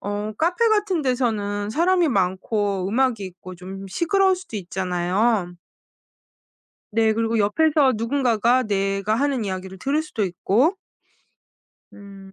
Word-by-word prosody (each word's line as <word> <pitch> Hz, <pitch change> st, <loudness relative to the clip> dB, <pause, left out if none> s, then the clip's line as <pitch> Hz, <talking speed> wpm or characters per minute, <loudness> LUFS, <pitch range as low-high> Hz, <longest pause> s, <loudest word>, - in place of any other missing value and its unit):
어 205 Hz, +1 st, -4 dB
카페 360 Hz, +8 st, +2 dB
같은 415 Hz, -5 st, +1 dB
데서는 215 Hz, -6 st, -1 dB
사람이 345 Hz, +3 st, +2 dB
많고 195 Hz, -1 st, -1 dB
음악이 235 Hz, -2 st, +1 dB
있고 185 Hz, 0 st, -10 dB
좀 190 Hz, +2 st, -9 dB
시끄러울 380 Hz, -, +2 dB
수도 360 Hz, -, -8 dB
있잖아요. 185 Hz, +2 st, -1 dB, 1.4 s
네. 220 Hz, 0 st, +3 dB
그리고 225 Hz, 0 st, 0 dB
옆에서 280 Hz, +6 st, +3 dB
누군가가 240 Hz, 0 st, +1 dB
내가 195 Hz, 0 st, 0 dB
하는 270 Hz, -2 st, 0 dB
이야기를 190 Hz, 0 st, -5 dB
들을 285 Hz, +7 st, 0 dB
수도 245 Hz, -9 st, -3 dB
있고 205 Hz, -, +1 dB, 1.2 s
음. 195 Hz, -1 st, -13 dB
215 Hz, 270 characters per minute, -22 LUFS, 195-270 Hz, 1.4 s, 네